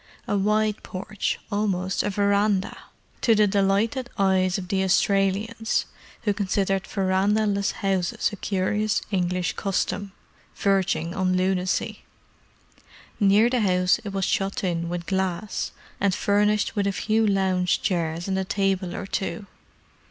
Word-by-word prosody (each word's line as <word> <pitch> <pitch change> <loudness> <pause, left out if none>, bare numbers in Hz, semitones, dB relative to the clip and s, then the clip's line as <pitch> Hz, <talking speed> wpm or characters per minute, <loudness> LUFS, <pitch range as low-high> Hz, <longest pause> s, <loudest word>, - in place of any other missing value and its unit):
A - - 0
wide 210 +1 +1
porch, 195 +2 -3
almost 195 -2 0
a - - -1
verandah; 200 0 +1 0.5
to 230 -3 +4
the 210 0 +5
delighted 205 +5 +1
eyes 190 -2 +2
of 185 -2 -6
the 195 -1 +1
Australians, 200 +4 +1 0.4
who 205 -3 +2
considered 195 -1 0
verandah 195 +2 +1
less 200 -1 +1
houses 190 -3 -1
a - - -3
curious 205 +2 0
English 180 -2 0
custom, 195 0 -2 0.4
verging 190 -4 +1
on 185 -1 +1
lunacy. 185 0 -1 1.2
Near 205 +2 +5
the 245 -1 +1
house 180 -2 +3
it 210 - -4
was 195 -1 -1
shut 195 +1 -1
in 170 -2 -1
with 175 0 -4
glass, 190 +2 -2 0.3
and 195 -2 +2
furnished 210 +1 +1
with 200 -1 +1
a - - +2
few 220 +2 +1
lounge 185 -3 +1
chairs 170 -1 -1
and 190 0 0
a - - 0
table 190 -2 -1
or 200 - -5
two. 195 +2 -3
195 Hz, 135 wpm, -25 LUFS, 185-205 Hz, 1.2 s, the